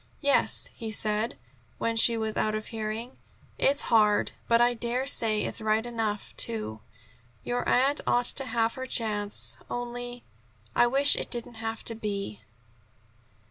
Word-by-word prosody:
"Yes," 285 -1 +3
he 225 -2 -6
said, 215 - 0 0.4
when 230 0 -1
she 230 +1 +6
was 220 -1 -2
out 215 0 0
of 215 - -4
hearing. 225 +2 -5 0.4
"It's 280 +1 +3
hard, 210 -2 +4 0.2
but 230 0 +4
I 240 +1 +4
dare 240 +2 -2
say 220 -6 +2
it's - - -3
right 220 +1 +1
enough, 225 -3 -3
too. 110 -1 0 0.6
Your 245 0 -2
aunt 275 +4 +3
ought 245 0 +2
to 270 +2 +1
have 230 -2 0
her 260 0 -6
chance. 210 -4 0
Only 245 0 -5 0.5
I 240 - +5
wish 275 +3 +5
it - - -3
didn't 240 0 -2
have 225 0 -4
to 230 - -3
be." 200 - -5
230 Hz, 150 wpm, -27 LUFS, 215-245 Hz, 0.6 s, she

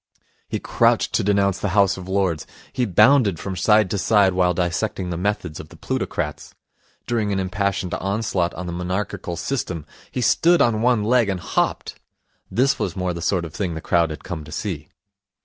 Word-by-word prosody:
He - - -2
crouched - - +2
to - - +2
denounce 100 -1 +2
the 105 -1 -2
House 100 -1 +4
of 95 0 -9
Lords. 95 -5 0 0.3
He 125 - 0
bounded 105 - +4
from 95 -1 -4
side 105 +3 +4
to 100 - 0
side 100 -2 +4
while 90 -1 +2
dissecting 90 +1 -1
the - - -2
methods 90 -3 -2
of - - -9
the - - -15
plutocrats. 75 -1 -4 0.5
During 110 -4 0
an 95 - 0
impassioned 95 -1 -1
onslaught 95 -3 -1
on 90 - -5
the 85 - -4
monarchical 90 0 -3
system 90 - -3 0.2
he - - -4
stood 170 +8 +4
on 110 -2 +3
one 120 -3 +3
leg 120 -1 +3
and 95 -2 -1
hopped. - - -2 0.5
This 135 +3 +2
was 90 - -2
more 90 -1 -1
the 85 - -6
sort 90 0 0
of 80 - -9
thing 90 -5 -3
the - - -4
crowd 85 +1 +2
had 75 - -7
come 85 -5 -5
to 75 - -12
see. 75 -2 -4
95 Hz, 190 wpm, -22 LUFS, 85-105 Hz, 0.5 s, House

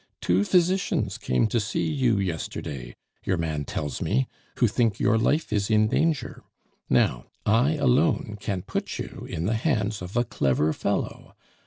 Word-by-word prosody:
Two 90 +3 +2
physicians 185 - +1
came 65 - +1
to 115 +2 +1
see 105 0 -1
you 130 -8 +2
yesterday, 75 -8 -4 0.3
your 95 - 0
man 80 -3 -2
tells 75 0 -4
me, 65 0 +1 0.3
who - - +4
think 115 -1 +1
your - - +3
life 120 +4 +1
is 100 0 0
in 110 -1 +4
danger; 160 +2 0 0.5
now, - - +2 0.2
I 120 +8 +3
alone 135 -5 +2
can 95 -4 -3
put - - -3
you - - -7
in 80 - -3
the 110 - +1
hands 110 - 0
of 90 +5 -5
a 120 - +4
clever 75 - +1
fellow. - - -3
105 Hz, 160 wpm, -26 LUFS, 85-125 Hz, 0.5 s, who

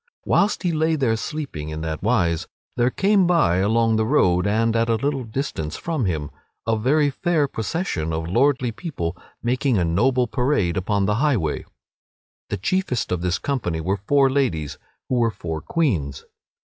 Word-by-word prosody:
Whilst 205 +1 +2
he 175 - +1
lay 160 0 +1
there 130 -7 +1
sleeping 115 - -5
in 80 0 -5
that 80 -1 -4
wise 85 -7 +1 0.3
there 120 +1 +2
came 195 +5 +3
by, 165 - +3
along 110 +3 +2
the 110 - +2
road, 90 -9 +3
and 115 +2 +1
at 115 0 +1
a 115 - +3
little 135 +3 -1
distance 110 - -4
from 160 -8 -2
him, 80 -6 -2 0.3
a 115 0 +2
very 140 +6 +2
fair 160 -1 +1
procession 110 - -2
of 80 0 -3
lordly 125 +5 +2
people, 100 - -4 0.3
making 125 0 +1
a 90 - +2
noble 125 +10 +2
parade 125 - 0
upon 100 +1 0
the 105 +1 +1
highway. 120 - 0 0.8
The 105 - -2
chiefest 125 - -1
of 90 -2 -1
this 90 0 0
company 105 -13 -2
were 95 +5 -1
four 135 +8 +3
ladies, 125 - -1 0.3
who 130 - 0
were 115 -1 +3
four 80 -7 -5
queens. 80 - -1
115 Hz, 170 wpm, -22 LUFS, 90-140 Hz, 0.8 s, came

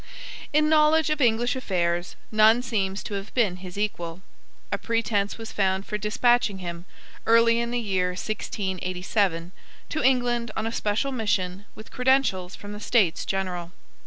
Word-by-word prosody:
In 305 0 +3
knowledge 310 0 +4
of 305 -1 0
English 240 +1 +2
affairs 175 -7 -1 0.2
none 220 +3 +5
seems 200 -5 -1
to - - -6
have 200 +1 -5
been 210 -8 +2
his 185 0 -9
equal. 180 -4 -3 0.5
A - - -1
pretence 225 -3 0
was 225 -1 -7
found 190 -1 0
for 210 - -4
despatching 215 0 +2
him, 175 -1 -6 0.4
early 230 0 +5
in 235 0 -1
the 245 - -1
year 190 -5 0
1687, 185 -3 -2 0.4
to 310 - -2
England 245 -2 +2
on 220 - -1
a 225 - -1
special 220 +5 -1
mission 205 -5 -1
with 215 - -12
credentials 250 -8 +1
from 205 0 -9
the 210 - -7
States 210 -7 +2
General. 180 -2 -3
210 Hz, 155 wpm, -25 LUFS, 185-235 Hz, 0.5 s, none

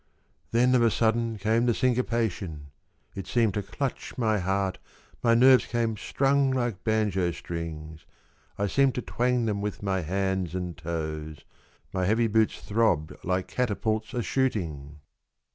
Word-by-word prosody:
Then 125 +2 +3
of 125 - +4
a 115 - +5
sudden 115 0 +1
came 110 +4 +1
the 120 - +3
syncopation; 110 - -1 0.4
It 95 -2 -6
seemed 115 -5 +2
to 105 - -1
clutch 135 +8 -4
my 110 -4 +1
heart, 95 +1 -1 0.4
My 115 -1 +4
nerves 130 +2 +6
came 115 -2 0
strung 135 +5 +1
like 120 -7 -1
banjo 105 -5 +1
strings 80 -2 -6 0.2
— - - -36
I 100 - 0
seemed 135 +5 +2
to 125 - -3
twang 125 -1 0
them 105 -2 -1
with 105 0 -4
my 95 -2 0
hands 95 0 -1
and 90 -2 -3
toes, 80 -2 -5 0.5
My 95 -1 0
heavy 110 +4 +3
boots 110 0 +1
throbbed 100 -8 +1
like 95 +1 -1
catapults 110 -1 -1
a 120 - 0
shooting 80 - -2
105 Hz, 150 wpm, -27 LUFS, 90-120 Hz, 0.5 s, nerves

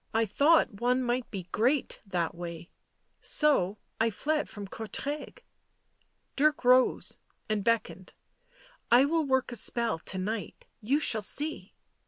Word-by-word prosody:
" - - -37
I - - +2
thought 280 - +2
one 250 +1 +2
might 245 0 -1
be 195 -3 -6
great 255 +6 0
— - - -32
that 170 -1 -1
way, 170 0 -8 0.5
so, 215 - +2 0.2
I 225 +1 +3
fled 300 +7 -2
from 205 -1 -7
Courtrai." 275 - -5 1.0
Dirk 300 0 +2
rose 255 +1 +3 0.3
and 215 -2 -1
beckoned. 190 -6 -1 0.4
" - - -29 0.3
I 245 +3 +7
will 320 +1 +1
work 265 -1 +1
a - - -5
spell 230 -4 0
to 190 - -6
night. 205 +3 -5 0.2
You 265 +7 +1
shall 220 -7 +4
see." 295 +9 -2
235 Hz, 150 wpm, -29 LUFS, 200-285 Hz, 1.0 s, I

